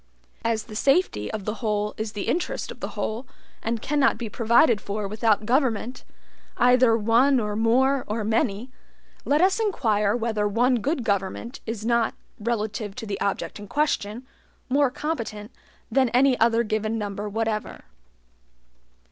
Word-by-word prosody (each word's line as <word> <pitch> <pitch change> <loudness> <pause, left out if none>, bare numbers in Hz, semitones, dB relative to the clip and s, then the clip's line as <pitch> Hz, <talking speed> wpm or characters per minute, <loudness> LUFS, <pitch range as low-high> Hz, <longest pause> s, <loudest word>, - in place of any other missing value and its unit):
As 225 -1 0
the 215 - -11
safety 275 - +1
of 210 -3 -5
the 210 - -1
whole 210 -2 -1
is 220 0 -4
the 205 - -4
interest 350 - -2
of - - -11
the - - -6
whole, 230 +4 -3 0.3
and 225 0 -2
cannot 285 -4 +2
be 230 -1 -5
provided 235 0 +3
for 205 0 -3
without 215 0 +1
government, 250 -1 0 0.5
either 250 -2 +5
one 235 +5 +4
or 210 -2 -2
more 255 +5 +3
or 215 +1 -2
many, 220 +1 0 0.5
let 295 +3 +3
us 375 +3 +3
inquire 220 - +1
whether 220 -3 0
one 245 +5 +2
good 265 +4 -1
government 200 +4 -2
is 220 -1 -4
not, 235 -1 +1 0.2
relative 215 -2 -2
to 240 - -6
the 200 -2 -4
object 200 +1 -2
in 205 - -9
question, 245 -4 -1 0.4
more 280 +1 +3
competent 240 -7 -4 0.4
than 265 -2 +3
any 255 +2 +4
other 230 +1 +3
given 215 0 -1
number 205 0 -4
whatever. 220 0 -2
225 Hz, 150 wpm, -25 LUFS, 210-255 Hz, 0.5 s, either